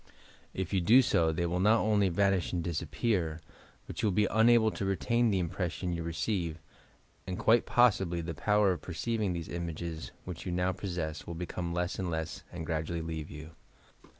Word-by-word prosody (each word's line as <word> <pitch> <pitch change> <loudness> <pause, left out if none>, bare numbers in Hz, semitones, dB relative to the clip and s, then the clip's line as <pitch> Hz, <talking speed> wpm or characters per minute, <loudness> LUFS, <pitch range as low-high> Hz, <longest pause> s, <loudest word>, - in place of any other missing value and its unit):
If 95 0 -3
you 95 - +2
do 120 +10 +6
so 80 -8 +2
they 85 +2 -1
will 85 +1 -1
not 105 +4 +5
only 105 -3 +3
vanish 95 0 +1
and 85 -2 -1
disappear, 85 +1 -1 0.5
but - - -6
you - - +2
will 100 - +1
be 105 - +4
unable 110 0 +5
to - - -5
retain 115 +5 +1
the 100 - +1
impression 90 0 -2
you 85 - -3
receive 85 0 -2 0.7
and, 90 -1 -3
quite 115 +1 +3
possibly, 95 -8 +3
the 85 0 -4
power 105 +4 +3
of 90 - -3
perceiving 105 +2 -2
these 85 -2 -4
images, 85 -1 -5 0.2
which 90 -3 -6
you 90 - -4
now 90 +1 +1
possess, 85 -5 -4
will 85 - -5
become 85 0 -4
less 90 +1 -2
and 95 -2 -2
less 80 -1 -3
and 85 -2 -6
gradually 80 +1 -2
leave 80 -2 -5
you. 75 +2 -9
90 Hz, 185 wpm, -31 LUFS, 85-100 Hz, 0.7 s, do